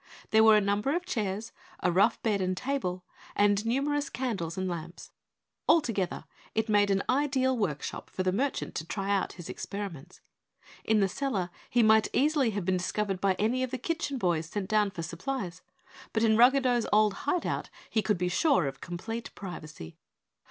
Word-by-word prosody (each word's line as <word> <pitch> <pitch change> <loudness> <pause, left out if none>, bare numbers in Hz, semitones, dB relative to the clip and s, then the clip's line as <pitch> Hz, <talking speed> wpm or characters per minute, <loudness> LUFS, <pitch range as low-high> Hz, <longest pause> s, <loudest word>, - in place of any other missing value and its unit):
There 220 0 +6
were 220 -1 +7
a - - +3
number 205 +8 0
of 355 +1 -2
chairs, 215 - -3 0.3
a 180 - +1
rough 200 +6 +3
bed 210 -4 +1
and 185 0 -1
table, 215 -10 -2 0.3
and 205 0 +3
numerous 285 +4 0
candles 215 -9 -3
and 185 0 -1
lamps. 170 -1 -6 0.6
Altogether 230 - +2 0.3
it 220 0 +1
made 205 -1 +3
an 195 0 +2
ideal 260 -1 +2
workshop 175 - -3
for 185 - -3
the 185 - +2
merchant 265 +9 -1
to 160 - -4
try 200 +1 -1
out 195 - -1
his 175 -2 -9
experiments. 195 -8 -6 0.6
In 220 -1 +3
the 195 - +4
cellar 195 -5 -2 0.2
he 240 -1 +3
might 220 0 +5
easily 285 -2 +3
have 200 -4 -3
been 185 0 +2
discovered 195 +1 -2
by 195 -1 +2
any 230 +6 0
of 255 - -1
the 260 - -3
kitchen 290 0 -2
boys 170 -7 0
sent 190 +2 -4
down 210 -1 +2
for 175 -4 -6
supplies, 185 +2 -4 0.5
but 220 - +1
in 220 -1 +4
Ruggedo's 245 0 +4
old 210 -1 +4 0.2
hideout 350 - -1 0.2
he 220 - +1
could 210 0 +1
be 180 +1 0
sure 265 - +3
of 135 - -5
complete 225 +7 -5
privacy. 155 - -8
210 Hz, 180 wpm, -29 LUFS, 185-245 Hz, 0.6 s, were